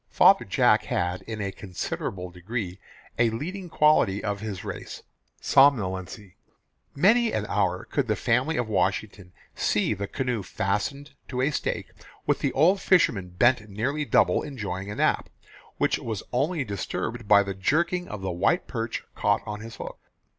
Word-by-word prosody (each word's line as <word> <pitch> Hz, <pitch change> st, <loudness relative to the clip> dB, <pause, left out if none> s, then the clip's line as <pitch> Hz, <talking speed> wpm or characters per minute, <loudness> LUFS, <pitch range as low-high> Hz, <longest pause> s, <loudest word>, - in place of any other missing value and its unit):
Father -, -, +5 dB
Jack -, -, +3 dB
had 90 Hz, +1 st, -1 dB
in 110 Hz, -2 st, -4 dB
a 100 Hz, -1 st, -2 dB
considerable 90 Hz, -1 st, -5 dB
degree 95 Hz, +1 st, -5 dB, 0.4 s
a 120 Hz, -1 st, +4 dB
leading 175 Hz, -, -5 dB
quality 150 Hz, -12 st, +3 dB
of 105 Hz, -1 st, -2 dB
his 105 Hz, -3 st, -5 dB
race -, -, -7 dB, 0.4 s
somnolency. 100 Hz, -7 st, +2 dB, 0.6 s
Many 220 Hz, +9 st, +4 dB
an 105 Hz, -, -1 dB
hour 95 Hz, -3 st, 0 dB
could 140 Hz, -4 st, -1 dB
the 110 Hz, -, +1 dB
family 125 Hz, +9 st, +1 dB
of 120 Hz, -, 0 dB
Washington 95 Hz, -1 st, -1 dB, 0.2 s
see 105 Hz, +1 st, +1 dB
the 100 Hz, 0 st, -4 dB
canoe 125 Hz, -3 st, -2 dB
fastened 105 Hz, +10 st, -2 dB, 0.2 s
to 125 Hz, -1 st, -2 dB
a 140 Hz, +4 st, +2 dB
stake, -, -, -3 dB, 0.3 s
with -, -, +1 dB
the -, -, 0 dB
old 180 Hz, +7 st, +4 dB
fisherman 110 Hz, -, +3 dB
bent 110 Hz, +4 st, +2 dB
nearly 130 Hz, +10 st, -1 dB
double -, -, +3 dB
enjoying 100 Hz, -8 st, -5 dB
a 105 Hz, -, -5 dB
nap, -, -, +1 dB, 0.5 s
which -, -, +1 dB
was 110 Hz, -3 st, -4 dB
only 145 Hz, +5 st, +1 dB
disturbed 110 Hz, +2 st, -4 dB
by 100 Hz, -1 st, +6 dB
the 100 Hz, 0 st, -4 dB
jerking 170 Hz, -, 0 dB
of 105 Hz, -2 st, -7 dB
the 95 Hz, -1 st, -2 dB
white 95 Hz, -, +1 dB
perch 115 Hz, -2 st, -4 dB
caught -, -, +1 dB
on 105 Hz, 0 st, -5 dB
his 115 Hz, +1 st, -9 dB
hook. -, -, -8 dB
110 Hz, 160 wpm, -26 LUFS, 100-140 Hz, 0.6 s, by